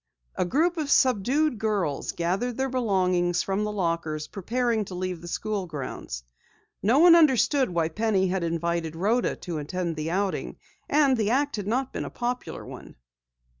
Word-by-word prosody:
A - - 0
group 330 - +1
of 300 -3 -2
subdued 260 +2 +2
girls 205 -10 -1
gathered 195 +8 -1
their 265 0 0
belongings 185 -7 +1
from 195 +2 -1
the 210 - -2
lockers, 165 -5 -2
preparing 230 +3 -1
to 185 - -8
leave 180 -2 -3
the 175 - -9
school 200 +1 -3
grounds. 130 - -6 0.6
No 230 +7 +3
one 340 +2 +8
understood 280 -3 +4
why 170 -2 0
Penny 200 +1 +1
had 185 -1 -1
invited 170 -1 -2
Rhoda 215 +8 +1
to 170 -4 -5
attend 170 +3 -3
the 155 +1 -3
outing, 195 +2 -2 0.3
and 285 -3 +4
the 215 -2 +1
act 280 +2 +1
had 205 -1 -4
not 255 +4 -1
been - - -3
a - - -5
popular 245 +1 -4
one. - - -11
200 Hz, 170 wpm, -26 LUFS, 170-250 Hz, 0.6 s, one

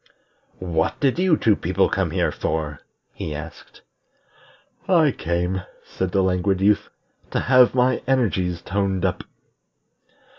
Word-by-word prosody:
"What 85 -3 -1
did 140 +3 +1
you 180 -4 +3
two 110 -2 +3
people - - +1
come - - -1
here - - 0
for?" 75 -2 -3 0.3
he 75 - -5
asked. 75 +2 -10 1.1
"I 165 -6 +4
came," 90 0 -2 0.2
said 95 -1 -3
the 95 0 +2
Languid 95 +1 +1
Youth, 100 +2 +2 0.4
"to - - -1
have 130 -1 +4
my 125 0 +2
energies 95 -10 0
toned 95 -1 -1
up." 90 - -1
95 Hz, 125 wpm, -22 LUFS, 90-125 Hz, 1.1 s, I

